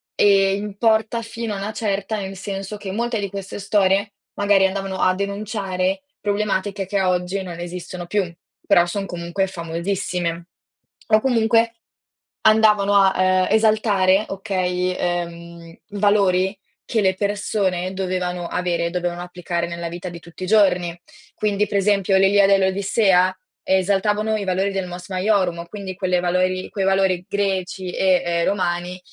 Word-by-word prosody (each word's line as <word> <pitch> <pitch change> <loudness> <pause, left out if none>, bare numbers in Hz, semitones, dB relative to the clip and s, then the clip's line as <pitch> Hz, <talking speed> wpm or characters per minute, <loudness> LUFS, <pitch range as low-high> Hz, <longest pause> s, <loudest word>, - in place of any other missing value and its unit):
ehm, 195 -1 +4
importa 220 +2 +1
fino 230 -1 -5
a - - -4
una 200 +2 -4
certa, 210 0 -2
nel 190 0 -6
senso 195 +2 -5
che 200 -2 -6
molte 235 +1 -1
di 200 -1 -3
queste 195 +1 -7
storie, 200 0 +1 0.2
magari 200 -1 +3
andavano 195 0 -2
a 185 - +4
denunciare 200 +1 -2 0.2
problematiche 205 -1 -1
che 195 +1 -1
oggi 180 +1 0
non 175 -2 -7
esistono 175 0 -6
più, 185 -2 -1 0.3
però 175 - +5
son 195 +3 -3
comunque 175 +2 -2
famosissime. 170 -1 -3 0.6
O 215 - +5
comunque, 230 -1 +2 0.7
andavano 210 -2 +5
a, 195 -1 +5
ehm, 185 0 +3
esaltare 215 -3 +3
okay, 185 -2 -1
ehm, 170 -1 -4 0.2
i 205 -1 -7
valori 195 -2 +2 0.3
che 225 - 0
le 190 -1 +3
persone 200 -3 -1
dovevano 180 -2 -2
avere 175 -1 -1
e - - 0
dovevano 175 -1 -2
applicare 175 -1 -3
nella 170 0 -5
vita 175 +2 -7
di 170 - -9
tutti 170 +2 -11
i - - -3
giorni. 180 -5 +3 0.4
Quindi, 210 0 0
per 200 - -1
esempio 195 -1 +2
l'Iliade 195 +1 +5
e - - +3
l'Odissea, 190 -1 +3 0.3
esaltavano 205 +3 +1
i 200 - -4
valori 190 +2 0
del 190 -2 -3
Mos 180 +2 -9
Maiorum, 185 -3 0
quindi 195 0 -7
quelle 185 -1 0
valori 185 +1 0
quei 195 -2 -2
valori 190 -2 +2
greci 190 -2 -2
e, 185 0 +2
ehm, 170 -1 0
romani, 180 -1 -1
190 Hz, 150 wpm, -21 LUFS, 180-205 Hz, 0.7 s, però